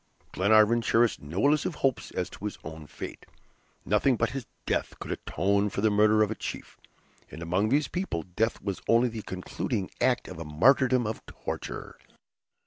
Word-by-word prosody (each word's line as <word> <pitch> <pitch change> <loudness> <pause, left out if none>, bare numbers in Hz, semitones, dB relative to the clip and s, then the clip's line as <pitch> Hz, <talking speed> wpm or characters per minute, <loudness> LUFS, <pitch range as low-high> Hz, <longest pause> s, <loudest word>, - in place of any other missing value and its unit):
Glenarvan 110 +4 +4
cherished 115 0 +2
no 80 - -1
illusive 150 +3 +2
hopes 135 -4 0
as 90 - -2
to 105 - -9
his 105 - -4
own 80 -1 -8
fate; - - -8 0.6
nothing 105 +6 +3
but 115 - +1
his 135 -3 -5 0.2
death - - -1
could - - -6
atone 100 +4 0
for 100 - -3
the 110 0 +3
murder 110 +1 +5
of 105 - -1
a - - +1
chief, - - -7 0.5
and 80 - -8
among 90 +6 +1
these 145 +4 +2
people 180 - -3
death 110 +7 -1
was 100 -2 -3
only 120 +2 +4
the 115 -1 -6
concluding 95 +2 -4
act 125 -2 +2
of 90 -2 -8
a - - -4
martyrdom 125 - +4
of 110 +1 -4
torture. - - -6
110 Hz, 175 wpm, -28 LUFS, 95-120 Hz, 0.6 s, murder